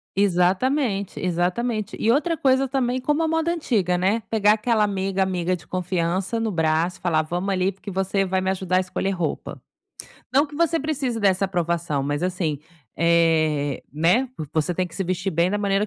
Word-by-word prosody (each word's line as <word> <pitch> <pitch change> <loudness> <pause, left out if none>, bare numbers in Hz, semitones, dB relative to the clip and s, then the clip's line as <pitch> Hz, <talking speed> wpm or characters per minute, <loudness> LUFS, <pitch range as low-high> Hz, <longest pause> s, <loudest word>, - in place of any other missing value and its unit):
Exatamente, 200 +4 +1
exatamente, 185 +5 -1
e 225 - +3
outra 320 +6 +1
coisa 270 -2 +2
também, 255 -1 0
como 295 +4 0
a 325 - +1
moda 325 +1 +1
antiga, 215 - 0
né, 195 +6 +1
pegar 210 -2 +4
aquela 220 0 +1
amiga 195 -1 -1
amiga 185 -1 0
de 175 - -14
confiança 185 +3 -1
no 225 -1 -1
braço, 165 +1 +1
e - - -28
falar: 165 -3 +2
"Vamos, 175 +5 -3
ali, 185 +1 +1
porque 200 +1 -9
você 195 +1 0
vai 190 0 0
me 190 - -1
ajudar 185 -1 0
a - - +5
escolher 185 +1 -2
roupa". 175 -5 -4 0.7
Não 280 +4 +4
que 290 0 -11
você 330 0 +2
precise 270 -6 -2
dessa 195 -1 +3
aprovação, 170 -5 -1
mas, 145 +2 -2
assim, 175 -5 -1 0.4
eh, 160 -4 +2
né, 175 - +2
vo 155 - -5
você 160 +2 0
tem 185 +1 0
que 170 - -14
se 195 - -2
vestir 185 +2 -2
bem 170 +1 +1
da 205 - 0
maneira 200 0 +1
190 Hz, 190 wpm, -23 LUFS, 175-225 Hz, 0.7 s, a